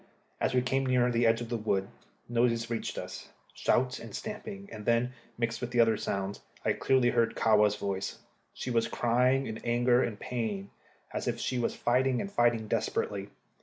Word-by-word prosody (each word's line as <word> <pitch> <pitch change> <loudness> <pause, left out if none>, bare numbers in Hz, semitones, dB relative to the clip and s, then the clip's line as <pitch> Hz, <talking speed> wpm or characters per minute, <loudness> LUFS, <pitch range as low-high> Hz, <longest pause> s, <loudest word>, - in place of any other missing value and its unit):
As - - +1
we 125 - +3
came 135 +1 +1
near 125 -1 +3
the 120 0 +3
edge 115 +1 +3
of 120 - -5
the 120 - -1
wood, 100 -3 0 0.4
noises 115 -1 +1
reached 115 - -3
us - - -7 0.2
shouts 125 +1 +1
and 115 -3 -8
stamping; 210 -2 -6
and 105 - -7
then, 120 +3 +2 0.2
mixed 115 0 -1
with 125 - -2
the 120 - 0
other 115 -1 +5
sounds, 100 -1 -3 0.2
I - - +3
clearly 130 -2 +3
heard 115 - +2
Kahwa's 105 -2 +4
voice. 100 -1 -3 0.3
She 125 - -5
was 115 -1 +2
crying 125 +4 +2
in 110 -2 -5
anger 120 +1 +3
and 105 -3 -2
pain, 110 -5 -3 0.4
as - - -3
if - - -1
she 125 - -1
was 120 - 0
fighting, 125 +1 +2
and 200 - -4
fighting 120 - +2
desperately. 100 -1 -1
120 Hz, 185 wpm, -30 LUFS, 110-125 Hz, 0.4 s, other